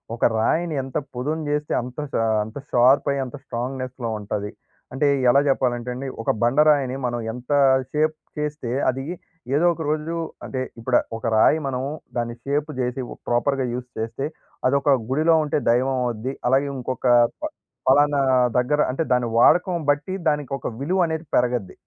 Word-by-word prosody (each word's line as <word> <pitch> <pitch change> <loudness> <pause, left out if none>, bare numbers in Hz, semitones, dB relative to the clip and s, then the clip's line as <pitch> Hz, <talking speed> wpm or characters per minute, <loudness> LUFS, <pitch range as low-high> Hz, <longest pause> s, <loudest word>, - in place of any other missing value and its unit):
ఒక - - +1
రాయిని 160 +9 +1
ఎంత 135 0 -4 0.2
పొదును 150 +6 -2
చేస్తే 150 0 -1
అంత 125 +3 -8
ష - - -4 0.3
అంత 110 +3 -9
షార్ప్ 125 +3 +5
అయ్యి 140 -1 -1
అంత 125 - -8
స్ట్రాంగ్‌నెస్‌లో 130 -1 -4
ఉంటది. 105 0 -4 0.4
అంటే 135 +2 +1 0.2
ఎలా 135 - +6
చెప్పాలంటే 125 -2 0
అండి 135 +2 -5
ఒక - - +1
బండరాయిని, 140 +1 +3
మనం 120 -1 -1
ఎంత 125 +3 -8 0.4
షేప్ 155 +1 +1 0.2
చేస్తే 150 -5 -3 0.2
అది 135 +1 -3 0.5
ఏదో 160 +4 +3
ఒక 165 - -8
రోజు 155 +2 -1 0.3
అంటే, 130 - -4 0.2
ఇప్పుడు 120 +1 +2 0.2
ఒక 115 - -9
రాయి 145 - +5
మనం 130 -1 -2 0.4
దాన్ని 120 0 -2
షేప్ 145 +2 -1
చేసి, 125 +1 -2
ఒక - - -10
ప్రాపర్‌గా 130 +3 +1
యూజ్ 125 0 -5
చేస్తే 115 +4 -3 0.4
అదొక 140 +2 +2 0.2
గుడిలో 155 +5 +3
ఉంటే 150 - 0
దైవం 130 +3 +2
అవుద్ది. 120 +2 -3
అలాగే, 135 +3 +3
ఇంకొక 130 +1 -3 0.3
ప - - -13 0.4
పలానా 145 +2 +4 0.4
దగ్గర 145 +4 +2
అంటే 135 +5 -1
దాని 125 -1 +2
వాడకం 175 +9 +5
బట్టి 145 +5 +1
దానికి 150 -3 0
ఒక 125 - -5
విలువ 175 +8 0
అనేది 160 0 -3
పెరగద్ది. 120 -5 +1
135 Hz, 160 wpm, -23 LUFS, 125-150 Hz, 0.5 s, ఎలా